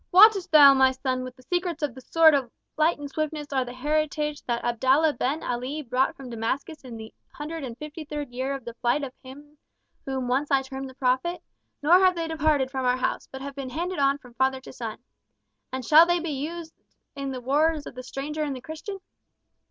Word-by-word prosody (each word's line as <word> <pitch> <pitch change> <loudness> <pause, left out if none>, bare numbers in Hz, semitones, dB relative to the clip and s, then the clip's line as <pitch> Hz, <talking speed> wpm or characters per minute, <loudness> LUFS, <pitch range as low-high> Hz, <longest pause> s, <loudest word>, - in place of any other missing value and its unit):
"Wottest 390 0 +7
thou, 290 -3 +9
my 265 -1 +5
son, 260 -1 -2
that 255 -1 -9
the 255 - -19
secrets 350 +1 -2
of 285 -5 -1
the 260 - -11
sword 320 +4 +5
of 270 -4 +1 0.3
light 315 +3 +2
and 290 -1 -6
swiftness 300 0 -4
are 265 -1 +2
the 245 - -8
heritage 300 +1 -1
that 235 -1 -2
Abdallah 265 +6 +3
Ben 275 +5 -2
Ali 255 +5 -3
brought 255 +1 0
from 260 -3 -9
Damascus 265 +7 -3
in 245 -3 -8
the 220 0 -10 0.2
hundred 310 +1 -6
and 240 -3 -6
fifty 300 +2 -7
third 295 -3 -6
year 260 +3 -2
of 270 - -9
the 235 - -6
flight 240 +5 0
of 260 -2 -5
him 290 +3 -13 0.5
whom 265 -2 -2
once 270 +4 0
I 275 -1 +3
termed 265 0 -6
the 260 - -14
prophet; 270 +7 0 0.4
nor 345 +5 +7
have 370 -1 +4
they 335 -1 -2
departed 305 -4 +1
from 265 -1 -2
our 250 0 +2
house, 255 - -2
but 265 0 -7
have 280 0 -6
been 270 -1 -6
handed 345 +6 -3
on 275 0 +3
from 250 -4 -17
father 265 +2 +1
to - - -11
son. 230 -1 -6 0.7
And 260 -1 -4
shall 315 +5 +8
they 350 0 +2
be 335 -2 -3
used 320 +4 -5 0.4
in 275 -1 -4
the 260 -1 -4
wars 295 +4 +1
of - - -8
the 255 - -7
stranger 280 +4 -5
and 290 -3 -1
the 255 - -8
Christian?" 320 +8 -7
275 Hz, 220 wpm, -26 LUFS, 255-310 Hz, 0.7 s, thou